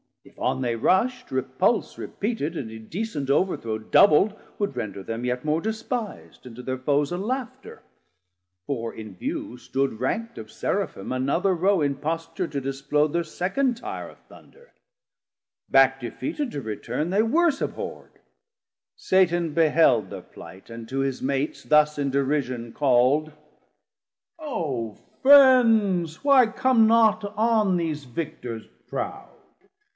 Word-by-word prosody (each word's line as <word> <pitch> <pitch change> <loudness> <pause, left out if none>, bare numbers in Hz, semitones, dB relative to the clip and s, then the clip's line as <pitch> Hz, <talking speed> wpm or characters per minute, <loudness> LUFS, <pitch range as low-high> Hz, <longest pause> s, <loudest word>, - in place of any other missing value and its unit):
if - - -20
on 130 - -1
they 120 -2 -1
rusht, 250 - +1
repulse 130 - 0
600 - - -8
Repeated, 200 -7 -3
and 115 -7 -5
indecent 145 - -5
overthrow 140 - 0
Doubl'd, 175 - +4 0.2
would 200 -9 -2
render 100 -5 -5
them 115 +4 -5
yet 125 +2 -2
more 155 +2 +1
despis'd, 220 - -5
And 120 -3 -10
to 125 - -9
thir 130 0 -3
foes 145 +3 0
a 175 - -2
laughter; 245 +5 -5 0.8
for 115 -5 -3
in 110 -3 -9
view 120 +6 -5
Stood 135 -2 -2
rankt 230 - -2
of 110 -1 -10
Seraphim 95 - -3
another 140 +9 +1
row 190 +1 +2
In 140 -1 +1
posture 165 +5 -3
to 140 -2 -4
displode 140 +3 0
thir 170 0 +1
second 220 - -1
tire - - -6
Of - - -17
Thunder: 480 +1 -19 1.0
back 135 0 +5
defeated 285 - -4
to 145 - -5
return 125 +8 -4
They 200 +3 +3
worse 310 +5 +2
abhorr'd. - - -6 0.8
Satan 175 -4 +1
beheld 150 - +3
thir 95 -2 -7
plight, 95 +3 -14
And 115 0 -8
to 135 - -3
his 135 -1 -2
Mates 140 +2 -2
thus 150 0 +3
in 140 -1 0
derision 130 -4 -1
call'd. 140 +3 +2 1.1
O 145 - -4 0.3
Friends, 230 - +5
why 275 -4 +6
come 230 0 +3
not 220 -1 +4
on 215 -4 +2
these 155 -4 -3
Victors 120 -4 -6 0.2
proud? - - -5
150 Hz, 140 wpm, -24 LUFS, 130-210 Hz, 1.1 s, why